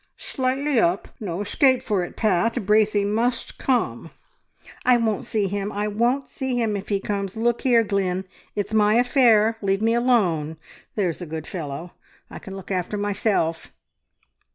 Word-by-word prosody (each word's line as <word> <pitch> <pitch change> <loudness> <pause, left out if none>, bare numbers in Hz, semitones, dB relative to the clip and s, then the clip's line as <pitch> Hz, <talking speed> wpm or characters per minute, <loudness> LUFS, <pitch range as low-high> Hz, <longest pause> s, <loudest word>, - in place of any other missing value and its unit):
"Slightly 265 +1 0
up! 180 -1 +1
No 185 -3 -4
escape 260 +5 +2
for 200 -5 0
it, 175 - -7
Pat. 215 +1 +1
Braithey 210 0 +3
must 230 +4 -1
come!" 255 -2 0 0.7
"I 250 -1 +5
won't 220 -3 -1
see 215 -2 0
him. 200 +1 -3
I 205 0 -2
won't 240 +6 0
see 265 -2 -3
him 220 -3 0
if 200 -1 -6
he 200 -2 +1
comes! 200 0 -3
Look 235 +1 +1
here, 240 -3 +4
Glynn, 190 -2 -1 0.3
it's 205 +1 -3
my 210 0 +4
affair! 230 -3 +4
Leave 195 +1 0
me 225 +1 +3
alone, 185 -11 +1 0.4
there's 185 -5 -1
a 175 - -5
good 160 0 -5
fellow! 165 -1 -6 0.4
I - - -8
can 195 - -9
look 195 0 -9
after 185 +2 -2
myself..." 200 -5 -1
210 Hz, 160 wpm, -23 LUFS, 195-235 Hz, 0.7 s, I